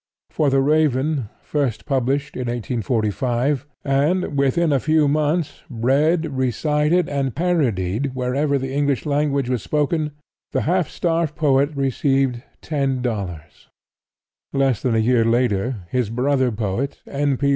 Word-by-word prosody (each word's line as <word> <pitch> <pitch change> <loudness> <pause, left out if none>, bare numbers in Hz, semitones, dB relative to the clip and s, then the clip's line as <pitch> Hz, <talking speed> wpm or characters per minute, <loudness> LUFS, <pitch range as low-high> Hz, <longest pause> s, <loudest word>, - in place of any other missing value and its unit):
For 150 -2 +1
"The 135 0 +3
Raven," 145 -3 +1
first 140 -7 -2
published 140 +2 0
in 125 -1 -3
1845, 120 +3 -1 0.2
and, 145 +4 +1
within 140 +4 +2
a 135 - +3
few 155 +1 +2
months, 150 +2 0
read, 140 +8 +2
recited 150 +6 +1
and 135 -3 -2
parodied 135 - 0
wherever 135 +3 0
the 135 0 -4
English 140 -3 0
language 140 -2 0
was 125 -3 -1
spoken, 150 +2 0 0.4
the - - +1
half 180 0 +1
starved 165 -3 -1
poet 140 -3 +3
received 135 -2 +1 0.2
$10! 135 -4 -1 1.5
Less 135 -4 +1
than 125 -3 +1
a 110 -1 +2
year 120 -1 +4
later 115 -3 0
his 125 -4 0
brother 130 +2 +1
poet, 110 +6 -2
N. 140 -1 0
P. 140 +2 +1
135 Hz, 130 wpm, -21 LUFS, 125-150 Hz, 1.5 s, year